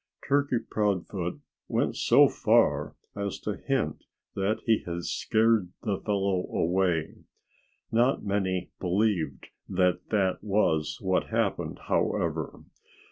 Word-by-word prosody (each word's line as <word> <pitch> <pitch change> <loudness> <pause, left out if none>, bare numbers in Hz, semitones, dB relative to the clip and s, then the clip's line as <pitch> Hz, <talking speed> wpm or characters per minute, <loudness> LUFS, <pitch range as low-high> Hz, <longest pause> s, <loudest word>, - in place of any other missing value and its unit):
Turkey 140 -2 +2
Proudfoot 100 -5 -2 0.3
went - - 0
so - - +6
far - - +2 0.2
as 100 -1 -3
to 105 - -3
hint 130 - -2 0.3
that 100 +3 -1
he 110 -2 +4
had 85 0 -5
scared 110 -2 +2
the 100 -5 -1
fellow 100 -3 0
away. 85 -2 0 0.7
Not 120 +1 +2
many 95 -3 -1
believed 90 -5 0 0.2
that 90 -1 +1
that 95 -4 +1
was 80 -7 +1
what 95 -1 +1
happened, - - -1
however. - - -1
95 Hz, 110 wpm, -28 LUFS, 90-110 Hz, 0.7 s, so